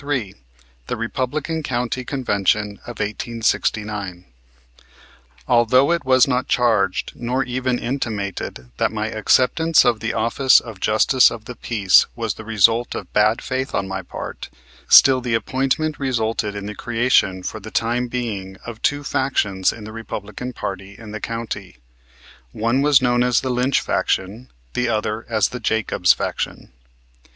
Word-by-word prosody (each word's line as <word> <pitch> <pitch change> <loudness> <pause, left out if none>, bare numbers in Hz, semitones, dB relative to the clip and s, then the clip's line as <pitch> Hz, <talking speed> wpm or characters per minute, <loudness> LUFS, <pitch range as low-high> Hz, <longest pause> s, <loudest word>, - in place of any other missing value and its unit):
CHAPTER 145 +1 -2
III 105 -7 -4 0.5
THE - - -3
REPUBLICAN 140 +7 -2
COUNTY 125 -2 -2
CONVENTION 105 -5 0
OF 120 -3 -7
1869 105 -3 -2 1.2
Although 125 +5 +4
it 170 -3 0
was 130 -1 +4
not 125 -1 0
charged 110 -6 +1
nor 125 +2 -1
even 125 0 -1
intimated 100 - -4
that - - +1
my - - -2
acceptance 160 +4 +3
of 120 -3 +2
the 110 0 -2
office 115 +4 +4
of 115 -5 -10
Justice 110 +6 +4
of 115 -1 -9
the 125 - -7
Peace 100 -7 +3
was 115 -4 -2
the - - -10
result 115 +2 +2
of - - -7
bad 105 +2 +2
faith 130 +1 -3
on 95 - -1
my 95 0 -4
part, 90 - -8 0.4
still 130 -1 +7
the 120 -2 0
appointment 135 +7 -1
resulted 115 -5 -1
in 100 -1 -5
the 105 - -5
creation 115 -5 +1
for 110 - -5
the 110 +2 -9
time 120 +2 0
being 105 -6 -4
of 115 -2 -8
two 145 0 0
factions 105 -9 0
in 115 - -10
the 110 - -8
Republican 115 +2 -6
party 95 -3 -6
in 110 -2 -10
the 110 - -6
county. 115 - -5 0.8
One 115 +5 +1
was 145 -2 +4
known 120 -1 +2
as 125 -1 +2
the 130 - -2
Lynch 125 +2 +2
faction, 105 +7 -2 0.2
the 125 -1 0
other 110 0 -2
as 110 -3 +2
the 125 - -6
Jacobs 110 -5 +2
faction. - - -3
115 Hz, 155 wpm, -21 LUFS, 105-130 Hz, 1.2 s, still